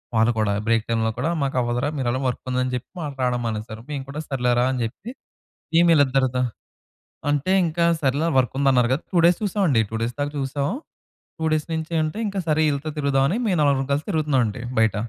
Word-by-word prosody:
వాళ్ళు 110 +1 +4
కూడా. 105 -2 +1
బ్రేక్ 115 -1 +3
టైమ్‌లో 110 -1 +1
కూడా 140 +6 0
"మాకు 140 -1 -1
అవ్వదురా 120 +4 -1
మీరు 130 - -1
ఎలాగో 130 +2 -2
వర్క్ 125 - -5
ఉందని" 125 0 0
జెప్పి 125 0 -6
వాళ్ళు 145 -3 -5
రాడం 125 -1 0
మానేశారు. 110 0 -4
మేము 140 -3 -3
కూడా 145 +2 -5
సర్లేరా 125 -3 +1
అని 130 - -2
జెప్పి 205 - -7 0.7
ఏందీళ్ళిద్దరితో 135 -6 +3 0.9
అంటే 145 +5 +1
ఇంకా 170 +1 +1 0.2
సర్లే 140 +3 +1
వర్క్ 125 -4 +2
ఉందన్నారు 130 -3 +3
గదా 140 - -1
2 180 - +1
డేస్ 175 0 +5
చూసామండి. 185 - +2
2 110 - -5
డేస్ 115 +2 -1
దాకా 145 0 -1
చూసాం. 140 +1 -1 0.7
2 - - -3
డేస్ 155 -1 -1
నుంచి 160 +1 -3
అంటే 155 +5 -3
ఇంకా 200 -1 -3
సరే 155 0 +2
ఈళ్ళతో 145 +2 -2
తిరుగుదాం 140 -2 +2
అని 200 - 0
మేము 190 -5 +1
నలుగురం 140 -2 +2
కలిసి 145 +2 0
తిరుగుతున్నాం 150 -7 +1
అండి 105 +3 -5 0.2
బయట. 110 -2 +3
135 Hz, 195 wpm, -23 LUFS, 125-155 Hz, 0.9 s, డేస్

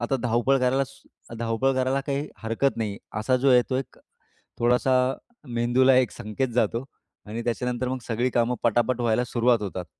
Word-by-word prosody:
आता 120 +3 0
धावपळ 120 +3 +2
करायला, 130 +2 +2
स 115 - -15
धावपळ 115 +3 0
करायला 130 +1 +1
काही 140 +1 -2
हरकत 115 +5 0
नाही. 105 -3 -3 0.2
असा 130 +4 +1
जो 135 +2 +2
आहे, 125 -1 +6
तो 130 - +1
एक 130 -1 -5 0.6
थोडासा 125 +2 +2 0.6
मेंदूला 125 +3 +4
एक 130 -2 +3
संकेत 110 +5 -3
जातो 115 +1 +1 0.4
आणि 110 +3 -5
त्याच्यानंतर 125 +1 -2
मग 130 - -2
सगळी 120 +2 0
कामं 120 0 +1
पटा-पट 120 +1 +1
व्हायला 120 +1 +2
सुरुवात 120 -1 +2
होतात. 95 -3 -4
125 Hz, 170 wpm, -25 LUFS, 115-130 Hz, 0.6 s, आहे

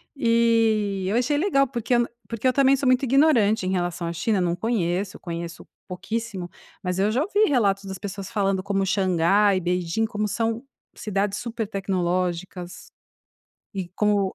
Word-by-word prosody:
E 225 -5 +2
eu 205 - 0
achei 265 +4 +1
legal 275 -6 +2
porque 235 +1 -2
eu 240 - +5
n 240 - +1 0.2
porque 230 +2 -2
eu 255 - +3
também 275 0 +4
sou 270 -1 -1
muito 255 +2 +3
ignorante 240 -7 +3
em 185 - 0
relação 175 -2 -2
à 170 - -3
China, 205 +3 0
não 175 -1 0
conheço, 185 -3 -1
eu - - -25
conheço 170 -1 -7 0.2
pouquíssimo, 200 0 -4 0.4
mas 180 +1 -2
eu 205 +2 +3
já 255 +5 +1
ouvi 410 +3 +2
relatos 200 -8 +1
das 190 -1 -6
pessoas 195 -1 -6
falando 195 -2 0
como 195 0 -1
Xangai 195 +1 +3
e - - +1
Beijing, 180 +4 -1
como 210 -1 -2
são 225 +3 -1 0.3
cidades 205 0 -1
super 230 -3 -4
tecnológicas 180 -2 -3 0.8
e 185 -3 -4
como 205 -2 +1
205 Hz, 170 wpm, -24 LUFS, 185-230 Hz, 0.8 s, eu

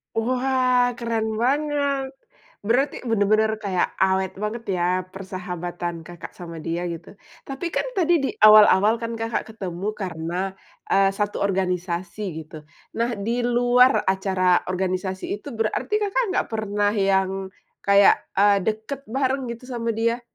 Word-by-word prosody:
Wah, 250 +1 +2
keren 225 -2 -2
banget, 280 +1 0 0.6
berarti 270 +6 +1
bener-bener 215 0 +2
kayak 195 -4 -2
awet 190 0 +2
banget, 210 +4 -4
ya, 175 - 0 0.3
persahabatan 175 -3 -5
Kakak 175 -1 -10
sama 170 -2 -8
dia, 165 +2 -3
gitu. 170 +4 -10 0.3
Tapi, 275 +5 -4
kan, - - -1
tadi 345 -2 +3
di 270 - 0
awal-awal, 215 0 +7
kan, 230 0 -4
Kakak 225 0 -3
ketemu 190 -4 -6
karena, 170 -3 -4 0.6
eee, 195 0 +4
1 205 0 -2
organisasi, 180 -1 -2 0.2
gitu. 155 +1 -12 0.4
Nah, 235 0 0
di 230 +5 -2
luar 245 -1 +4
acara 190 -2 +2
organisasi 185 +1 -2 0.2
itu - - -10
berarti 225 - -1
Kakak 415 +3 0
nggak - - +1
pernah 205 -1 0
yang 195 -2 +2 0.5
kayak, 200 0 +5 0.2
eee, 200 +1 +5
dekat 220 +7 -3
bareng, 265 +1 -1
gitu, 235 +1 -7
sama 240 -2 -4
dia? 230 +2 0
215 Hz, 135 wpm, -23 LUFS, 190-240 Hz, 0.6 s, awal-awal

